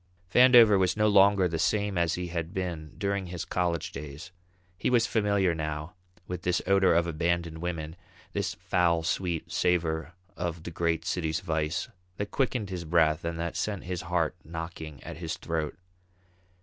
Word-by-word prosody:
Vandover 120 Hz, -5 st, +8 dB
was 95 Hz, +2 st, +1 dB
no 105 Hz, 0 st, +4 dB
longer 100 Hz, -2 st, +5 dB
the 80 Hz, -1 st, -3 dB
same 105 Hz, +3 st, +1 dB
as 85 Hz, -2 st, +1 dB
he 90 Hz, -1 st, -4 dB
had 85 Hz, 0 st, -4 dB
been 85 Hz, -5 st, -4 dB
during 100 Hz, -2 st, -1 dB
his 90 Hz, -1 st, -5 dB
college 85 Hz, -3 st, -1 dB
days. 75 Hz, +4 st, -8 dB, 0.4 s
He -, -, -1 dB
was 120 Hz, -2 st, +4 dB
familiar 100 Hz, -6 st, +2 dB
now 75 Hz, +1 st, -4 dB, 0.3 s
with 90 Hz, -1 st, -5 dB
this 90 Hz, 0 st, +1 dB
odour 95 Hz, -2 st, +4 dB
of 85 Hz, 0 st, +3 dB
abandoned 85 Hz, 0 st, -1 dB
women, 85 Hz, -2 st, -4 dB, 0.4 s
this -, -, -1 dB
foul 85 Hz, -2 st, +1 dB
sweet 85 Hz, 0 st, -2 dB
savour 80 Hz, -1 st, 0 dB, 0.2 s
of 85 Hz, -2 st, -4 dB
the 85 Hz, -, -6 dB
great 85 Hz, 0 st, 0 dB
city's 85 Hz, 0 st, -1 dB
vice, 80 Hz, +2 st, -1 dB, 0.3 s
that 100 Hz, 0 st, -4 dB
quickened 125 Hz, -7 st, -1 dB
his 90 Hz, -2 st, -4 dB
breath 80 Hz, -1 st, +2 dB
and 85 Hz, 0 st, -3 dB
that 85 Hz, 0 st, -3 dB
sent 105 Hz, -3 st, -2 dB
his 90 Hz, -1 st, -4 dB
heart 85 Hz, -2 st, 0 dB
knocking 80 Hz, -2 st, -7 dB
at -, -, -7 dB
his 80 Hz, -1 st, -4 dB
throat. 80 Hz, -2 st, -3 dB
85 Hz, 165 wpm, -28 LUFS, 80-95 Hz, 0.4 s, Vandover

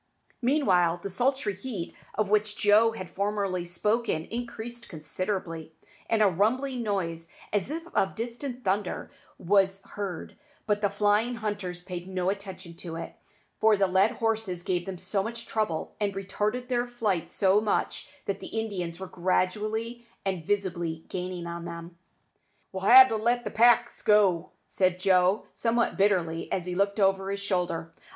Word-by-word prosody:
Meanwhile 185 Hz, -, +3 dB
the 200 Hz, -, -4 dB
sultry 250 Hz, +1 st, +1 dB
heat 190 Hz, -3 st, -6 dB, 0.2 s
of 215 Hz, -1 st, +1 dB
which 210 Hz, +1 st, +1 dB
Joe 215 Hz, +2 st, +5 dB
had 185 Hz, -5 st, -6 dB
formerly 195 Hz, -1 st, -1 dB
spoken 210 Hz, -1 st, 0 dB
increased 235 Hz, +1 st, -6 dB
considerably, 165 Hz, 0 st, -4 dB, 0.4 s
and 225 Hz, -1 st, +4 dB
a -, -, +6 dB
rumbling 245 Hz, +8 st, +1 dB
noise, 165 Hz, -6 st, -2 dB, 0.2 s
as 205 Hz, +2 st, 0 dB
if 330 Hz, +2 st, -4 dB
of 190 Hz, -, +1 dB
distant 245 Hz, +2 st, -5 dB
thunder, 195 Hz, 0 st, -1 dB, 0.3 s
was 195 Hz, +1 st, +2 dB
heard; 195 Hz, -5 st, -5 dB, 0.3 s
but 210 Hz, -1 st, +1 dB
the 205 Hz, -, +2 dB
flying 210 Hz, +4 st, +2 dB
hunters 205 Hz, -5 st, -4 dB
paid 180 Hz, -1 st, -6 dB
no 185 Hz, 0 st, 0 dB
attention 190 Hz, -3 st, -7 dB
to 170 Hz, -2 st, -7 dB
it, 165 Hz, -, -6 dB, 0.5 s
for 220 Hz, -1 st, +5 dB
the 195 Hz, -, +4 dB
led 190 Hz, +3 st, +3 dB
horses 220 Hz, -6 st, -1 dB
gave 180 Hz, 0 st, -1 dB
them 190 Hz, -1 st, -4 dB
so 185 Hz, +3 st, -1 dB
much 230 Hz, +3 st, -5 dB
trouble, 210 Hz, -8 st, -2 dB
and 200 Hz, -2 st, -1 dB
retarded 210 Hz, +5 st, -2 dB
their 245 Hz, -1 st, 0 dB
flight 215 Hz, -8 st, -1 dB
so 195 Hz, +1 st, +3 dB
much, 215 Hz, -1 st, -1 dB, 0.2 s
that 200 Hz, 0 st, -2 dB
the -, -, -8 dB
Indians 180 Hz, -6 st, -4 dB
were 190 Hz, -, -5 dB
gradually 215 Hz, +6 st, -1 dB, 0.2 s
and 190 Hz, -4 st, -1 dB
visibly 175 Hz, -4 st, -2 dB
gaining 180 Hz, -1 st, -4 dB
on 170 Hz, 0 st, -5 dB
them. 170 Hz, 0 st, -7 dB, 0.8 s
"We'll 190 Hz, +1 st, -1 dB
ha' 260 Hz, +1 st, +11 dB
to 225 Hz, -, -1 dB
let 240 Hz, +3 st, +1 dB
the -, -, -4 dB
packs 235 Hz, +1 st, +4 dB
go," 200 Hz, -6 st, +4 dB, 0.2 s
said 185 Hz, -1 st, +1 dB
Joe, 185 Hz, +1 st, +3 dB
somewhat 235 Hz, 0 st, +1 dB
bitterly, 180 Hz, -5 st, +1 dB
as 180 Hz, -, -1 dB
he 180 Hz, -, -3 dB
looked 200 Hz, +3 st, +1 dB
over 195 Hz, 0 st, +2 dB
his 200 Hz, 0 st, -2 dB
shoulder. 175 Hz, -4 st, -1 dB
200 Hz, 160 wpm, -28 LUFS, 180-220 Hz, 0.8 s, ha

